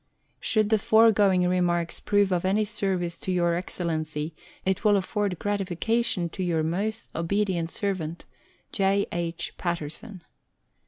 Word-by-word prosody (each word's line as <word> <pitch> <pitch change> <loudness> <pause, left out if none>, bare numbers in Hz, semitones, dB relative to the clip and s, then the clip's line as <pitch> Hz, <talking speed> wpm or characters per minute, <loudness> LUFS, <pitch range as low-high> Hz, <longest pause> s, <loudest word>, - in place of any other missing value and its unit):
Should 215 -2 +1
the 220 - +4
foregoing 205 -4 +4
remarks 175 -2 +1
prove 205 -2 +2
of 180 -2 +1
any 200 +3 +2
service 190 -5 -2
to 185 - -3
Your 175 -1 +2
Excellency, 160 -3 -3 0.3
it 190 +2 0
will 210 -2 +5
afford 200 -1 -1
gratification 205 0 0
to 185 - -6
Your 170 -3 +1
most 205 +8 -2
obedient 175 0 0
servant, 170 -4 -3 0.5
J. 195 0 +2
II. 170 -1 -2 0.2
PATTERSON. 170 +2 -4
185 Hz, 125 wpm, -26 LUFS, 170-205 Hz, 0.5 s, will